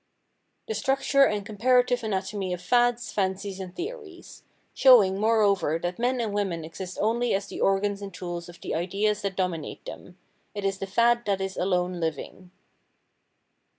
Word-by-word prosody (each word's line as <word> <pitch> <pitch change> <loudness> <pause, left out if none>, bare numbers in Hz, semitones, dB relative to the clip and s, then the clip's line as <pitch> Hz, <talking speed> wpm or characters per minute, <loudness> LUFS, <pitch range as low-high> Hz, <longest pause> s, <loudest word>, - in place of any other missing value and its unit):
The 445 - -2
Structure 275 -3 +3
and 205 -1 -2
Comparative 245 +3 +2
Anatomy 195 -2 -2
of 180 - -5
Fads, 240 +4 +2
Fancies 195 0 -2
and 185 -1 -7
Theories; 395 -2 -8 0.3
showing, 210 -8 +6
moreover, 205 -7 +2
that 175 +3 -4
men 250 +1 +1
and 220 -3 -2
women 185 -6 -2
exist 180 +3 -8
only 230 +1 +1
as 195 +1 -2
the - - -7
organs 200 +1 +1
and 200 -1 -6
tools 175 -2 -6
of 175 - -13
the - - -4
ideas 205 +5 0
that 200 -2 -3
dominate 180 -5 -3
them; 180 - -10 0.4
it 205 -1 -4
is 195 0 -1
the 195 - -4
fad 235 +4 +2
that 200 -2 0
is 190 0 -3
alone 180 -1 0
living. 165 +3 -5
200 Hz, 160 wpm, -26 LUFS, 185-235 Hz, 0.4 s, showing